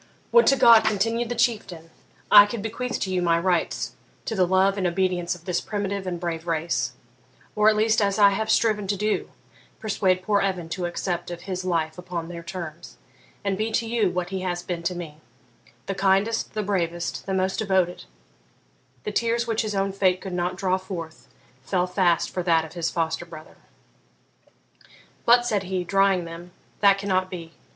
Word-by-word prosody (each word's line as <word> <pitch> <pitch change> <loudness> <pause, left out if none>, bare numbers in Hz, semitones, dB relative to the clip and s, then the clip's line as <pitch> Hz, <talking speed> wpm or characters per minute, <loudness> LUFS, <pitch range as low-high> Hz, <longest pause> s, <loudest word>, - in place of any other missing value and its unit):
'Would 475 - +6
to 275 - +6
God,' 230 -4 +7
continued 225 +2 0
the 240 - -2
Chieftain, 195 -9 -1 0.4
'I 205 0 +10
could 205 -1 -5
bequeath 235 +2 -3
to 190 - -1
you 180 - +1
my 170 -1 +3
rights 175 0 0 0.3
to - - -3
the 185 -4 +2
love 190 +2 +3
and 190 -3 0
obedience 180 -1 0
of 175 -1 -16
this 180 -2 -1
primitive 200 -2 -3
and 175 -2 -3
brave 170 -1 -4
race; 165 0 -1 0.6
or 210 0 +5
at 215 - +2
least, 220 +1 +2
as 200 0 +1
I 200 -1 +6
have 220 +2 -2
striven 215 -3 +2
to 200 +1 -1
do, 210 +2 -1 0.5
persuade 190 -4 0
poor 205 0 +2
Evan 185 -4 -2
to 175 +1 -2
accept 175 0 -3
of 175 -1 -7
his 185 0 -4
life 165 -3 -1
upon 175 -2 -5
their 170 -1 -7
terms, 170 -2 -8 0.5
and 195 -1 +1
be 220 +1 0
to 230 - +1
you 225 -4 +1
what 180 0 -3
he 190 -1 -3
has 175 -1 -3
been 175 -1 -4
to 175 +2 -2
me, 165 -4 -7 0.7
the 195 - -2
kindest, 195 +4 +1
the 215 - -1
bravest, 175 -4 -2
the 190 - -1
most 190 0 0
devoted 190 - 0 0.5
' 130 -1 -38
The 210 - -3
tears 235 +2 0
which 225 -2 0
his 215 -2 -3
own 195 0 0
fate 185 -2 +2
could 190 -2 -7
not 180 +1 -1
draw 185 0 0
forth 170 -4 -8 0.3
fell 180 +6 0
fast 180 -2 +1
for 180 - -2
that 165 -2 +2
of 160 - -12
his 170 -2 -1
foster 165 0 -2
brother. 155 -2 -12 1.7
'But,' 240 +1 +6
said 215 -5 +1
he, 185 -1 -3
drying 195 -1 +2
them,'that 175 +4 -1
cannot 185 -2 0
be. 170 -3 -8
185 Hz, 190 wpm, -24 LUFS, 175-205 Hz, 1.7 s, I